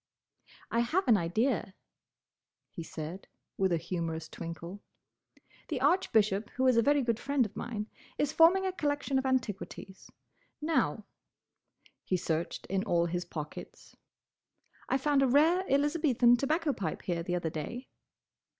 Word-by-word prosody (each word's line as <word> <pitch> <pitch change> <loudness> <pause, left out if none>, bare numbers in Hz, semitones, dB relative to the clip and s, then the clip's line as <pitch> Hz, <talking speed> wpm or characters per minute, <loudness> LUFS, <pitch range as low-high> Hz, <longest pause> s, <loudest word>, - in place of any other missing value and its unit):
"I 230 - +1
have 320 +12 +1
an 235 - +6
idea," 195 +3 0 1.0
he 175 - -7
said, 160 +3 -7 0.3
with 190 -1 +1
a 170 - +3
humorous 165 -1 -4
twinkle. 170 +5 -7 0.9
"The - - -2
Archbishop, 215 - +2
who 260 - +1
is 255 -2 +5
a 230 - +5
very 285 +3 +3
good 235 -2 0
friend 280 -2 +1
of 210 0 -9
mine, 215 -2 -4 0.3
is 290 -1 +1
forming 360 +4 +5
a 375 - 0
collection 290 -5 -1
of 265 - -2
antiquities. 205 -6 -3 0.5
Now—" 295 -8 0 1.0
he 185 - 0
searched 165 -1 -2
in 195 0 -1
all 170 -5 +2
his 175 +1 -2
pockets—"I 160 - -8
found 280 0 +2
a 270 - +4
rare 315 +8 +4
Elizabethan 280 -4 +3
tobacco 305 +3 0
pipe 180 -9 -4
here 170 -2 -2
the 175 +1 -2
other 170 -2 -2
day." 235 - -5
230 Hz, 140 wpm, -30 LUFS, 175-280 Hz, 1.0 s, an